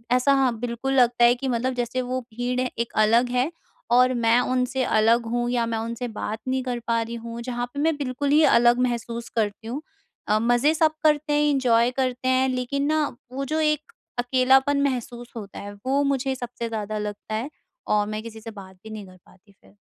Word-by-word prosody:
ऐसा 265 Hz, +3 st, +3 dB
हाँ, 260 Hz, -4 st, +2 dB
बिल्कुल 245 Hz, +3 st, -2 dB
लगता 245 Hz, -2 st, +4 dB
है 240 Hz, +1 st, +5 dB
कि 265 Hz, +2 st, -4 dB
मतलब 255 Hz, +1 st, 0 dB
जैसे 245 Hz, +1 st, -2 dB
वो 255 Hz, +1 st, -2 dB
भीड़ 245 Hz, +1 st, -3 dB
है 255 Hz, -, -1 dB
एक 235 Hz, -, -2 dB
अलग 235 Hz, +3 st, +3 dB
है 250 Hz, +6 st, +1 dB, 0.4 s
और 250 Hz, +1 st, +5 dB
मैं 235 Hz, 0 st, +3 dB
उनसे 255 Hz, +1 st, 0 dB
अलग 230 Hz, +2 st, +3 dB
हूँ 240 Hz, 0 st, 0 dB
या 240 Hz, -1 st, +1 dB
मैं 230 Hz, -1 st, -2 dB
उनसे 230 Hz, +2 st, -4 dB
बात 215 Hz, -1 st, -5 dB
नहीं 260 Hz, 0 st, 0 dB
कर 250 Hz, -1 st, -3 dB
पा 230 Hz, 0 st, +2 dB
रही 230 Hz, +1 st, -5 dB
हूँ, 230 Hz, 0 st, -7 dB
जहाँ 245 Hz, 0 st, -3 dB
पे 285 Hz, -, -5 dB
मैं 320 Hz, +1 st, +2 dB
बिल्कुल 280 Hz, 0 st, -2 dB
ही 305 Hz, +1 st, +5 dB
अलग 240 Hz, -1 st, +5 dB
महसूस 235 Hz, -1 st, -2 dB
करती 215 Hz, -1 st, -1 dB
हूँ। 265 Hz, +6 st, -4 dB, 0.5 s
अ, 210 Hz, +1 st, +3 dB
मज़े 245 Hz, +6 st, +3 dB
सब 320 Hz, -1 st, +3 dB
करते 300 Hz, -1 st, +2 dB
हैं, 295 Hz, 0 st, +3 dB
एंजॉय 245 Hz, -4 st, +3 dB
करते 255 Hz, -1 st, -1 dB
हैं 260 Hz, 0 st, +3 dB
लेकिन 255 Hz, +2 st, -1 dB
ना 310 Hz, -1 st, +2 dB, 0.3 s
वो 275 Hz, +1 st, -3 dB
जो 310 Hz, +3 st, -1 dB
एक 305 Hz, -1 st, 0 dB, 0.3 s
अकेलापन 265 Hz, +3 st, +3 dB
महसूस 245 Hz, -2 st, -3 dB
होता 210 Hz, -4 st, -8 dB
है, 205 Hz, 0 st, -7 dB
वो 275 Hz, +2 st, +2 dB
मुझे 270 Hz, -1 st, 0 dB
सबसे 245 Hz, -2 st, -5 dB
ज़्यादा 215 Hz, -1 st, -3 dB
लगता 210 Hz, +1 st, -5 dB
है 235 Hz, +7 st, -3 dB, 0.4 s
और 210 Hz, -1 st, +2 dB
मैं 215 Hz, 0 st, -4 dB
किसी 225 Hz, -1 st, -9 dB
से 225 Hz, +1 st, -8 dB
बात 190 Hz, -3 st, -12 dB
ही -, -, -8 dB
नहीं 215 Hz, -2 st, -7 dB
कर 185 Hz, 0 st, -16 dB
पाती 200 Hz, +2 st, -23 dB
फिर। -, -, -22 dB
245 Hz, 210 wpm, -24 LUFS, 230-265 Hz, 0.5 s, है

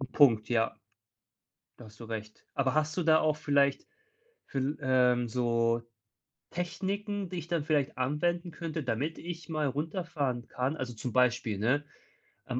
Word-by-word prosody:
'n 135 Hz, -, -3 dB
Punkt, 115 Hz, -7 st, +5 dB
ja. 115 Hz, -2 st, +1 dB, 1.0 s
Da 120 Hz, -, -11 dB
hast 110 Hz, +1 st, -15 dB
du 115 Hz, -, -7 dB
recht. 110 Hz, -1 st, -7 dB
Aber 135 Hz, 0 st, +1 dB
hast 155 Hz, +1 st, +1 dB
du 180 Hz, -, 0 dB
da 160 Hz, -1 st, +6 dB
auch 155 Hz, -1 st, +2 dB
vielleicht 140 Hz, -2 st, +2 dB, 0.6 s
viel 135 Hz, +2 st, -1 dB
ähm, 125 Hz, -2 st, +3 dB
so 115 Hz, -1 st, +2 dB, 0.7 s
Techniken, 195 Hz, +3 st, -2 dB
die 180 Hz, -, -6 dB
ich 165 Hz, -, -5 dB
dann 165 Hz, -4 st, -1 dB
vielleicht 150 Hz, -3 st, +1 dB
anwenden 170 Hz, +7 st, 0 dB
könnte, 165 Hz, -1 st, -4 dB
damit 135 Hz, +6 st, -2 dB
ich 170 Hz, -2 st, -7 dB
mal 155 Hz, -3 st, 0 dB
runterfahren 150 Hz, -4 st, -2 dB
kann? 130 Hz, +5 st, -1 dB
Also, 130 Hz, -4 st, -4 dB
zum 115 Hz, +1 st, -4 dB
Beispiel, 120 Hz, -4 st, +2 dB
ne, 130 Hz, +7 st, +2 dB, 0.6 s
am 125 Hz, -, -2 dB
140 Hz, 155 wpm, -30 LUFS, 125-160 Hz, 1.0 s, da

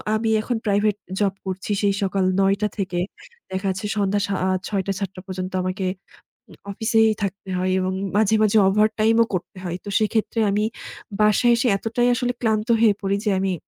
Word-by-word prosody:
আমি 225 Hz, +1 st, 0 dB
এখন 240 Hz, +2 st, -2 dB
private 205 Hz, 0 st, +2 dB, 0.2 s
job 200 Hz, -2 st, +1 dB
করছি। 190 Hz, +2 st, -4 dB
সেই 200 Hz, -1 st, +2 dB
সকাল 195 Hz, 0 st, 0 dB, 0.2 s
৯ 195 Hz, 0 st, +3 dB
টা 210 Hz, -, +2 dB
থেকে 185 Hz, -3 st, -2 dB, 0.5 s
দেখা 190 Hz, +1 st, -2 dB
যাচ্ছে 190 Hz, +2 st, -3 dB
সন্ধ্যা 200 Hz, 0 st, +1 dB
সা 200 Hz, -, -2 dB
আ -, -, +1 dB, 0.2 s
৬:০০-৭:০০ 195 Hz, -1 st, -3 dB
পর্যন্ত 185 Hz, 0 st, -4 dB
আমাকে 185 Hz, +1 st, -2 dB, 0.6 s
উম -, -, -14 dB, 0.2 s
অফিসেই 220 Hz, +2 st, +3 dB
থাকতে 195 Hz, 0 st, -4 dB
হয়। 185 Hz, +1 st, 0 dB
এবং 185 Hz, 0 st, -1 dB, 0.2 s
মাঝে, 220 Hz, 0 st, +3 dB
মাঝে 215 Hz, +1 st, +3 dB
ওভারটাইমও 215 Hz, +3 st, +3 dB
করতে 185 Hz, +1 st, -4 dB
হয়। 175 Hz, -1 st, -3 dB
তো -, -, -5 dB
সেক্ষেত্রে 220 Hz, +1 st, 0 dB
আমি 205 Hz, +1 st, +1 dB, 0.6 s
বাসায় 215 Hz, +3 st, +4 dB
এসে 245 Hz, +2 st, +1 dB
এতটাই 235 Hz, +3 st, 0 dB
আসলে 245 Hz, 0 st, -1 dB
ক্লান্ত 220 Hz, -2 st, +1 dB
হয়ে 215 Hz, -3 st, +6 dB
পড়ি 195 Hz, +1 st, +1 dB
যে -, -, +3 dB
আমি 190 Hz, -1 st, 0 dB
200 Hz, 175 wpm, -22 LUFS, 190-220 Hz, 0.6 s, হয়ে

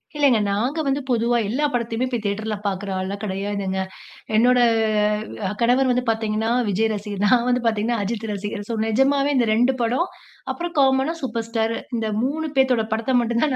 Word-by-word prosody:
இல்லங்க, 280 Hz, -6 st, +4 dB
நாங்க 245 Hz, +10 st, -1 dB
வந்து 275 Hz, +1 st, 0 dB
பொதுவா 240 Hz, 0 st, +2 dB
எல்லா 285 Hz, +6 st, 0 dB
படத்தயுமே 235 Hz, 0 st, -1 dB, 0.2 s
தியேட்டர்ல 215 Hz, +2 st, -2 dB
பார்க்ற 200 Hz, 0 st, -2 dB
ஆள்லாம் 195 Hz, +2 st, -4 dB
கெடையாதுங்க. 195 Hz, -1 st, -2 dB, 0.5 s
என்னோட 245 Hz, +3 st, +5 dB, 0.9 s
அ -, -, -3 dB
கணவர் 255 Hz, +3 st, +3 dB
வந்து 250 Hz, 0 st, +1 dB
பார்த்தீங்கன்னா, 220 Hz, 0 st, 0 dB, 0.2 s
விஜய் 220 Hz, +3 st, +1 dB
ரசிகர். 205 Hz, -1 st, -4 dB
நான் 245 Hz, +2 st, +3 dB
வந்து 250 Hz, 0 st, +1 dB
பார்த்தீங்கன்னா, 225 Hz, +1 st, 0 dB
அஜித் 225 Hz, +1 st, -3 dB
ரசிகர். 205 Hz, +1 st, -5 dB
சோ 230 Hz, -, -1 dB
நிஜமாவே 275 Hz, +5 st, +2 dB
இந்த 235 Hz, -3 st, +2 dB
2 245 Hz, +4 st, +3 dB
படம். 250 Hz, +10 st, +1 dB, 0.5 s
அப்புறம் 345 Hz, -1 st, -5 dB
காமனா, 270 Hz, +3 st, +3 dB
சூப்பர் 230 Hz, -2 st, -3 dB
ஸ்டாரு. 225 Hz, 0 st, -1 dB, 0.2 s
இந்த 220 Hz, -1 st, -1 dB, 0.2 s
3 310 Hz, +4 st, -1 dB
பேத்தோட 250 Hz, -4 st, +3 dB
படத்த 230 Hz, +4 st, 0 dB
மட்டும் 235 Hz, 0 st, 0 dB
தான், 275 Hz, -, 0 dB
230 Hz, 165 wpm, -22 LUFS, 215-260 Hz, 0.9 s, என்னோட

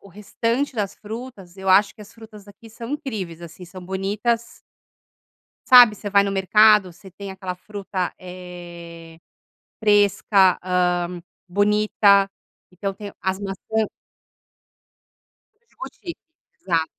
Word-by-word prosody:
o 200 Hz, -, -16 dB
restante 230 Hz, +7 st, -2 dB
das 205 Hz, -3 st, -2 dB
frutas, 215 Hz, -4 st, -9 dB
eu 190 Hz, 0 st, -5 dB
acho 195 Hz, +2 st, +5 dB
que 220 Hz, -, -17 dB
as 210 Hz, +1 st, -13 dB
frutas 220 Hz, -3 st, -14 dB
aqui 215 Hz, +2 st, -15 dB
são 230 Hz, +2 st, -9 dB
incríveis, 215 Hz, -, -5 dB
assim, 170 Hz, +2 st, -11 dB
são 180 Hz, +1 st, -11 dB
bonitas 205 Hz, +5 st, -2 dB, 1.1 s
sabe, 245 Hz, -4 st, +9 dB
você 205 Hz, 0 st, -6 dB
vai 200 Hz, 0 st, +4 dB
no 200 Hz, -, -2 dB
mercado 205 Hz, 0 st, +4 dB
você 190 Hz, +2 st, -16 dB
tem 200 Hz, +2 st, -9 dB
aquela 190 Hz, -1 st, -6 dB
fruta, 190 Hz, -1 st, -5 dB
eh, 175 Hz, -2 st, -11 dB, 0.6 s
fresca. 205 Hz, -2 st, +3 dB
Hã, 180 Hz, -1 st, 0 dB, 0.3 s
bonita. 205 Hz, 0 st, +3 dB, 0.4 s
Então 195 Hz, +2 st, -4 dB
tem 200 Hz, +1 st, -9 dB
as 190 Hz, 0 st, -1 dB
maçã 205 Hz, +3 st, -2 dB, 1.9 s
Boutique. 340 Hz, -3 st, -8 dB, 0.4 s
Exato. 165 Hz, -4 st, 0 dB
195 Hz, 120 wpm, -22 LUFS, 180-215 Hz, 1.9 s, sabe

